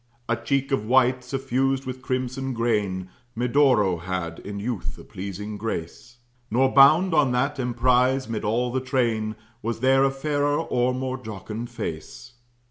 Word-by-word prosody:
A 120 - +1
cheek 140 +3 -1
of 135 -6 +1
white, 125 +2 +3
suffused 135 +1 -1
with 130 0 -6
crimson 130 +1 -2
grain, 105 -6 -1 0.2
Medoro 120 -6 +3
had, 85 -2 -4
in 100 0 -6
youth, 110 -1 -4
a - - -11
pleasing 100 +2 -6
grace; 110 +3 -5 0.3
Nor 130 +4 +2
bound 155 +7 +6
on 145 -5 +3
that 140 +3 0
emprize, 125 +2 +2
'mid 115 -2 -3
all 120 +4 0
the 130 +1 -1
train, 115 -4 0 0.3
Was 115 +1 -3
there 135 +1 +4
a 135 - +4
fairer 145 +1 0
or 125 +1 +1
more 130 0 -3
jocund 110 +1 -6
face. 115 +1 -7
125 Hz, 150 wpm, -24 LUFS, 110-135 Hz, 0.3 s, bound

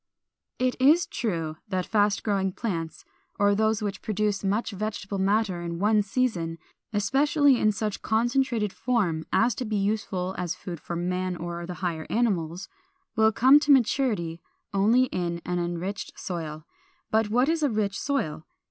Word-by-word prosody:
447. 255 - +2
It 255 +2 +3
is 350 - -3
true 165 -9 -3
that 185 -3 -1
fast 205 -1 +1
growing 195 -3 0
plants, 170 -6 -4 0.3
or 205 0 +4
those 220 +1 +1
which 200 -2 -3
produce 210 -2 -1
much 205 +4 0
vegetable 205 -1 -4
matter 195 -2 +1
in 170 -1 -4
one 210 +3 +3
season 195 -7 -1 0.3
(especially 270 +6 +3
in 215 - +3
such 210 0 -3
concentrated 235 -2 +1
form 195 -11 0
as 235 +1 +3
to - - -4
be 215 -2 -2
useful 195 -2 -1
as 180 -1 -2
food 175 -3 -7
for 170 - -6
man 180 +1 -1
or 170 0 -5
the 180 - -5
higher 160 -2 -3
animals) 185 -7 0 0.5
will 220 -1 +4
come 260 +6 +6
to 295 0 +2
maturity 220 - +2 0.3
only 220 +6 +4
in 175 -8 -2
an 180 0 -1
enriched 175 +3 -4
soil. 155 -3 -5 0.5
But 220 -1 +2
what 245 +5 +3
is 325 0 +1
a 295 - +3
rich 210 -3 -1
soil? 165 - -2
205 Hz, 160 wpm, -26 LUFS, 175-225 Hz, 0.5 s, come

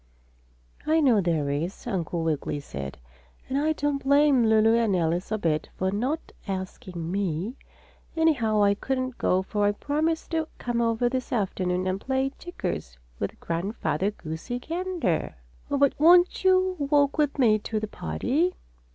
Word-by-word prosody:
"I 315 +1 +4
know 250 -9 +4
there 160 -5 0
is," 165 +7 -3
Uncle 175 -6 -2
Wiggily 155 -2 -1
said, 70 - -7 0.5
"and 265 - -3
I 305 +3 +2
don't 290 -2 -1
blame 280 -3 +4
Lulu 220 0 +5
and 230 -4 +2
Alice 175 +3 0
a 215 - +1
bit 155 -6 -1
for 190 0 0
not 255 +10 -2 0.2
asking 185 -3 -5
me. 190 +2 -1 0.6
Anyhow 230 -10 +3
I 200 0 +5
couldn't 255 +3 -3
go, 185 +1 +2
for 205 +1 0
I 205 - +2
promised 310 +9 -1
to 320 -1 0
come 240 -1 -1
over 230 +1 +1
this 255 0 -3
afternoon 185 -5 -1
and 185 +1 -1
play 265 0 0
checkers 180 - -5 0.2
with - - -4
Grandfather 175 0 -1
Goosey 165 +4 -6
Gander." 330 - -2 0.3
"Oh, 285 - 0
but 280 -1 +4
won't 350 +5 +5
you 370 0 +3
walk 285 +1 +2
with 295 -1 +1
me 220 -5 +4
to 215 +1 -3
the 215 - -3
party?" 260 - -1
225 Hz, 155 wpm, -26 LUFS, 185-285 Hz, 0.6 s, Lulu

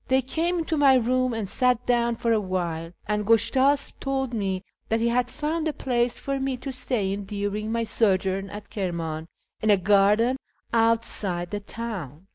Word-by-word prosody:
They 260 0 +3
came 335 +7 -1
into 325 -1 -1
my 275 -2 +6
room 255 +1 +2
and 225 -3 -3
sat 250 +3 +1
down 235 -1 +2
for 230 0 0
a 225 - +4
while, 170 -4 -3
and 210 0 0
Gushtasp 260 +6 +3
told 265 -2 -2
me 195 -4 -1 0.3
that 225 - +2
he 235 +1 +2
had 245 +1 +1
found 310 +3 -2
a 310 - -1
place 245 -3 0
for 275 0 -3
me 265 -1 -1
to 265 +2 -6
stay 220 -6 0
in 200 0 -5
during 205 +1 -3
my 230 0 0
sojourn 195 -3 +1
at 205 0 -9
Kirman 165 -5 -3 0.3
in 215 - +1
a 205 - +6
garden 210 +6 +3 0.4
outside 225 -6 +1
the 205 - -2
town. 200 - -6
225 Hz, 180 wpm, -25 LUFS, 195-255 Hz, 0.4 s, my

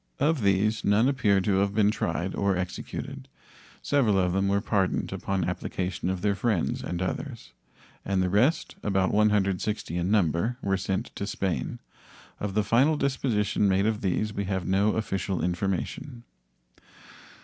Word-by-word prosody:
Of 150 -1 +2
these 100 +2 +2
none 105 +4 +3
appear 105 -8 +2
to 95 0 +1
have 100 +1 +1
been 105 -1 +4
tried 95 -3 -2
or 100 -2 +1
executed. 90 -1 -5 0.6
Several 120 -9 +2
of 90 -2 +2
them 95 +1 +1
were 100 +1 +2
pardoned 100 -3 0
upon 95 -2 -2
application 90 +1 -3
of 95 0 -3
their 105 -1 +3
friends 100 -4 0
and 90 +1 -3
others, 90 - -5 0.5
and 95 -1 0
the - - +1
rest, 120 - +2
about 95 -2 +1
160 105 -3 +1
in 90 +1 -1
number, 105 +3 +1
were 95 -1 +1
sent 95 0 -3
to 100 - -4
Spain. 95 -4 -2 0.6
Of 100 -1 -3
the 105 - +3
final 135 +9 +3
disposition 120 -8 +1
made 95 +1 +2
of 110 -1 0
these 105 +2 0
we 100 -1 -2
have 95 -2 -2
no 100 +4 +2
official 95 -3 -2
information. 95 +7 -3
100 Hz, 155 wpm, -27 LUFS, 95-110 Hz, 0.6 s, been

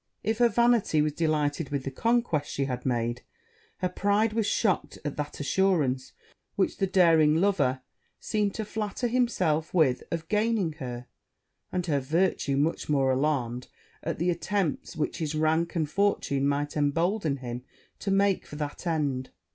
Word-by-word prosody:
If 220 +2 -1
her 240 -1 +5
vanity 235 -9 +3
was 150 -1 -1
delighted 150 -2 0
with 140 -2 -2
the 135 - -4
conquest 230 - +1
she 140 - -1
had 125 -1 -4
made, 120 0 -1 0.6
her 185 - +2
pride 205 +4 +1
was 225 -2 0
shocked 180 -9 0
at 145 - -3
that 150 0 -4
assurance 145 -5 +1 0.4
which - - 0
the 195 - +1
daring 165 -5 +5
lover 160 -8 +2 0.4
seemed 210 -2 -1
to 220 - -3
flatter 210 +3 -3
himself 185 -11 0
with 135 -7 +3
of 165 -1 -4
gaining 210 -5 +1
her; 125 -2 -5 0.7
and 180 -1 -1
her 145 -5 +1
virtue 145 -1 0
much 155 +3 0
more 135 -3 +3
alarmed 130 -3 -1 0.3
at - - -3
the 175 +3 +1
attempts 175 -1 -2
which 155 - -2
his 155 -2 -2
rank 160 +3 +1
and 160 -3 +1
fortune 160 -9 +1
might 145 +1 -1
embolden 160 +2 +1
him 125 -1 -6 0.4
to - - -3
make 195 0 +2
for - - -9
that 150 +3 -5
end. 140 -6 -1
160 Hz, 160 wpm, -27 LUFS, 140-195 Hz, 0.7 s, her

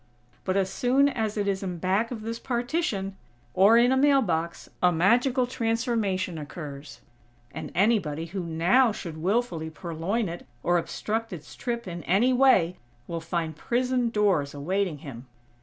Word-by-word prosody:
But 185 0 0
as 190 -1 0
soon 260 +6 +3
as 220 -5 -2
it 205 -1 0
is 195 -1 0
in 180 -3 -4
back 190 +6 0
of 225 -4 -6
this 230 +1 -4
partition, 240 - -2 0.4
or 200 - +6
in 240 +2 +5
a - - +4
mail 275 0 +4
box, 170 -3 -2
a 180 - +5
magical 245 - +3
transformation 225 - -1
occurs; 145 -1 -8 0.5
and - - -7
anybody 180 -7 +1
who 185 +3 -5
now 175 +10 +3
should 170 -6 -7
willfully 185 -4 0
purloin 170 +7 -2
it, 170 -3 -7 0.2
or 175 0 +3
obstruct 225 +6 -3
its 155 -5 -9
trip 235 -3 -4
in 175 -1 -5
any 220 +9 +3
way, 245 -10 +4 0.3
will 165 +2 -4
find 165 -1 -3
prison 245 +6 0
doors 195 -11 +1
awaiting 180 +3 -1
him. 125 -2 -9
195 Hz, 155 wpm, -26 LUFS, 170-235 Hz, 0.5 s, or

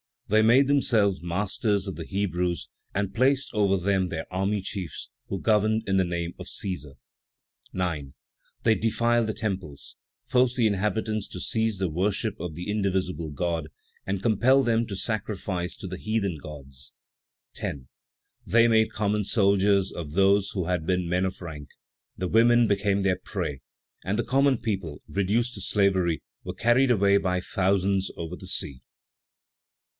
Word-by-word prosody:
These 110 +1 +4
made 130 +4 +5
themselves 110 -9 +2
masters 100 +3 -1
of 95 - -4
the 80 - -6
Hebrews, 90 -3 -2 0.3
and 100 -1 -1
placed 130 +2 +2
over 100 -3 +3
them 95 0 +1
their 80 -3 -4
army 95 +2 0
chiefs, 95 -4 -6 0.2
who 95 - -3
governed 110 0 +2
in 95 0 +1
the 95 - +3
name 85 -1 -3
of - - -7
Cæsar. 85 -8 -4 0.8
9. 80 -7 -2 0.5
They 115 - +5
defiled 115 +1 +1
the 110 - -1
temples, 95 -11 -5 0.3
forced 125 -1 +2
the 120 -3 +2
inhabitants 105 +1 0
to 90 - -8
cease 110 +1 0
the 95 -2 -1
worship 100 +6 -1
of 85 -2 -5
the 90 +5 -4
indivisible 95 -5 -1
God, 80 +1 -2 0.4
and 95 0 -2
compelled 125 +4 +4
them 115 -1 +2
to 100 - -5
sacrifice 95 -4 -3
to - - -9
the 95 0 -5
heathen 100 -5 -1
gods. 70 -3 -10 0.6
10. 65 -3 -5 0.6
They 115 +1 +5
made 110 -1 +3
common 105 -1 0
soldiers 100 -2 +3
of 75 -3 -7
those 100 +2 +3
who 95 -4 -2
had 90 -2 -1
been 90 -2 0
men 90 +2 +1
of 95 - -4
rank; 75 -4 -7 0.5
the 90 -1 -2
women 120 +1 +5
became 100 -1 +1
their 95 -2 +2
prey, 70 -2 -4 0.4
and 95 +5 -1
the 120 - +1
common 135 0 +3
people, 95 -10 -4
reduced 110 +5 0
to 100 - -7
slavery, 95 -4 +1 0.2
were - - -6
carried 120 +3 +3
away 100 -4 +4
by 90 -2 0
thousands 95 +1 +1
over 85 +1 -5
the - - -11
sea. 65 -3 -3
100 Hz, 160 wpm, -26 LUFS, 90-110 Hz, 0.8 s, made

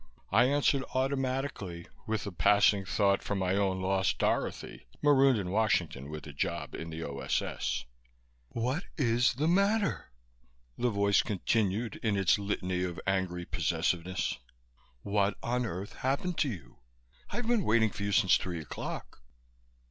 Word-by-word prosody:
I 115 +5 +5
answered 140 0 +2
automatically, 130 -9 -2 0.2
with 110 -2 -1
a 100 - -4
passing 100 +2 +4
thought 100 0 +2
for 100 - -3
my 95 -1 0
own 95 -2 0
lost 95 0 +1
Dorothy, - - -2
marooned 135 -3 +5
in 90 -3 -3
Washington 90 - 0
with 75 -2 -7
a 75 - -9
job 70 - -3
in 85 - -6
the 80 0 -5
O.S.S. 65 -2 -2 0.6
"What 130 +10 -2
is 120 -3 +2
the 150 +5 0
matter?" 200 - +1 0.6
the 125 - +1
voice 100 -1 +3
continued, 105 +1 -1
in 105 -3 +1
its 95 0 +3
litany 95 -3 -2
of 90 -1 -3
angry 95 -2 -1
possessiveness. 85 0 -1 0.6
"What 100 0 +1
on 125 0 0
earth 95 +2 -6
happened 140 +7 -1
to 145 - +2
you? 80 - -9 0.5
I've 245 - -3
been 230 -3 +2
waiting 110 -3 +3
for 100 - -8
you 100 0 -1
since 95 -1 +5
three 90 -2 -4
o'clock." 75 - -7
100 Hz, 145 wpm, -30 LUFS, 90-125 Hz, 0.6 s, I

